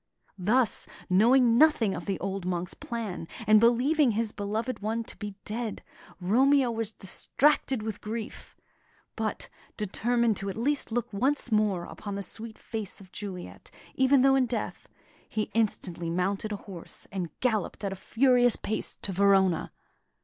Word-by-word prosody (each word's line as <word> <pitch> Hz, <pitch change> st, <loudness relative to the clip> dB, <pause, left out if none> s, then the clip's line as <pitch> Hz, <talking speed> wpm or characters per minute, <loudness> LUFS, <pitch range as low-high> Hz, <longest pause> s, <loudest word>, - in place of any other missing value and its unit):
Thus 225 Hz, +5 st, +2 dB, 0.2 s
knowing 235 Hz, +4 st, +5 dB
nothing 300 Hz, -10 st, +4 dB
of -, -, -6 dB
the 195 Hz, -2 st, -1 dB
old 195 Hz, 0 st, -3 dB
monk's 180 Hz, -1 st, -2 dB
plan, 215 Hz, -8 st, -5 dB, 0.2 s
and 215 Hz, 0 st, +7 dB
believing 245 Hz, +4 st, +4 dB
his 220 Hz, 0 st, 0 dB
beloved 220 Hz, +4 st, -3 dB
one 225 Hz, +3 st, -2 dB
to -, -, -8 dB
be 205 Hz, -2 st, -7 dB
dead, 225 Hz, 0 st, -4 dB, 0.4 s
Romeo 255 Hz, +7 st, +3 dB
was 225 Hz, -2 st, -3 dB
distracted 255 Hz, +4 st, +1 dB
with 220 Hz, -2 st, -5 dB
grief; 220 Hz, +1 st, -6 dB, 0.6 s
but, -, -, -3 dB, 0.3 s
determined 230 Hz, +2 st, +1 dB
to 195 Hz, -, -4 dB
at 195 Hz, -, -5 dB
least 275 Hz, +2 st, 0 dB
look 235 Hz, -2 st, -2 dB
once 260 Hz, +4 st, +1 dB
more 210 Hz, -5 st, +2 dB
upon 200 Hz, +3 st, -7 dB
the 200 Hz, -, -3 dB
sweet 220 Hz, +3 st, -5 dB
face 220 Hz, -4 st, -4 dB
of 190 Hz, -2 st, -15 dB
Juliet, 190 Hz, -4 st, -7 dB, 0.2 s
even 265 Hz, 0 st, +4 dB
though 270 Hz, 0 st, +6 dB
in 265 Hz, -2 st, +3 dB
death, 230 Hz, -2 st, -4 dB, 0.4 s
he 215 Hz, -, -2 dB
instantly 180 Hz, -6 st, -1 dB
mounted 195 Hz, +5 st, -1 dB
a -, -, -1 dB
horse, 185 Hz, -5 st, -7 dB
and 185 Hz, -4 st, -3 dB
galloped 220 Hz, -5 st, -1 dB
at 195 Hz, -, -2 dB
a -, -, -6 dB
furious 245 Hz, +4 st, +4 dB
pace 215 Hz, 0 st, -2 dB
to 195 Hz, -, +1 dB
Verona. 190 Hz, -2 st, +3 dB
215 Hz, 155 wpm, -28 LUFS, 195-240 Hz, 0.6 s, and